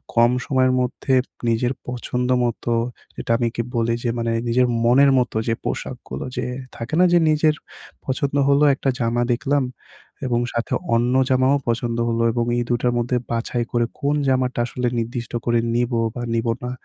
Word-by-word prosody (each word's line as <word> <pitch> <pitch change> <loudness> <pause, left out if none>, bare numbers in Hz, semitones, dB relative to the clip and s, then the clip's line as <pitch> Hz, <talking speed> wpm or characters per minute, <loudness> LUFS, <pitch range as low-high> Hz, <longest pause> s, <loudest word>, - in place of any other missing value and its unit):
কম 120 +1 +5
সময়ের 130 -2 +2
মধ্যে 130 +1 -1 0.4
নিজের 120 +2 +1
পছন্দ 125 0 -2 0.2
মতো। 120 0 -2 0.4
যেটা - - -4
আমি 120 -1 0
কি - - 0
বলি 115 0 +1
যে 120 - 0
মানে 115 0 -1 0.2
নিজের 125 +2 +3 0.2
মনের 135 +4 +5
মতো 120 -3 -1
যে 115 - +2
পোশাকগুলো 65 +1 -5
যে - - -1 0.3
থাকে 115 +3 -7
না 180 - +6
যে 175 - +6
নিজের 155 0 +3 0.5
পছন্দ 140 +1 -1
হলো 140 +1 +4
একটা 135 - -1
জামা 120 0 +1
দেখলাম। 135 +3 0 0.6
এবং 120 -1 +1
সাথে 120 0 -2 0.2
অন্য 120 +2 +2 0.2
জামাও 130 +2 +3
পছন্দ 115 0 -1
হলো। 115 0 0
এবং 120 0 0
এই 120 - +1
২ 120 - +2
টার 125 -1 +1
মধ্যে 120 +1 0
বাছাই 115 +1 -1
করে 120 -1 +2
কোন 145 +1 +1
জামাটা 130 -1 +1
আসলে 125 0 -2
নির্দিষ্ট 120 +1 -4
করে 120 -1 +2 0.2
নিবো 120 0 +1 0.2
বা 120 - -4
নিবো 115 0 +1
না। 125 - -3
120 Hz, 175 wpm, -22 LUFS, 115-130 Hz, 0.6 s, না